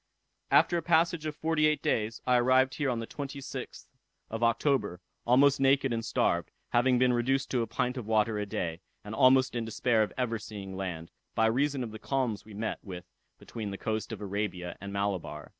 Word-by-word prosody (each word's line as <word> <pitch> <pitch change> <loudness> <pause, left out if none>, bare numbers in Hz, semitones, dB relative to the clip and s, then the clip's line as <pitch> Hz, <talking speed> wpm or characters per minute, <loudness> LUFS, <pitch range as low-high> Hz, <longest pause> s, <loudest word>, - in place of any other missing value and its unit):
After 175 - +4
a - - -1
passage 165 -1 +2
of 155 - -4
forty 155 -1 +2
eight 155 -2 0
days, 110 +1 -1
I 125 -1 +4
arrived 130 +2 +4
here 145 -2 -1
on 120 - 0
the 115 - -3
26th 140 -1 -7 0.5
of 115 +1 -4
October, 115 - +1 0.3
almost 135 +3 +5
naked 135 -1 +3
and 115 0 -2
starved, 85 -6 0 0.2
having 125 +1 +3
been 125 0 +3
reduced 130 +3 0
to 125 - +1
a 115 - -2
pint 125 +4 -1
of 120 -4 -5
water 110 -1 +2
a 105 - -3
day, 85 -3 -3 0.2
and 105 - -7
almost 130 +1 +5
in 120 - -1
despair 115 0 +1
of 105 - 0
ever 115 -3 -1
seeing 100 -3 -8
land, 90 -4 -5 0.2
by 110 - +3
reason 135 +4 +1
of 115 - -6
the 110 - -8
calms 125 -6 -1
we 105 -2 -12
met 110 +2 -3
with 90 -3 -8 0.3
between 110 -3 -6
the 100 - -5
coast 110 +2 -3
of 110 -2 -6
Arabia 100 -3 -3
and 100 0 -6
Malabar. 100 -2 -3
115 Hz, 200 wpm, -29 LUFS, 105-135 Hz, 0.5 s, almost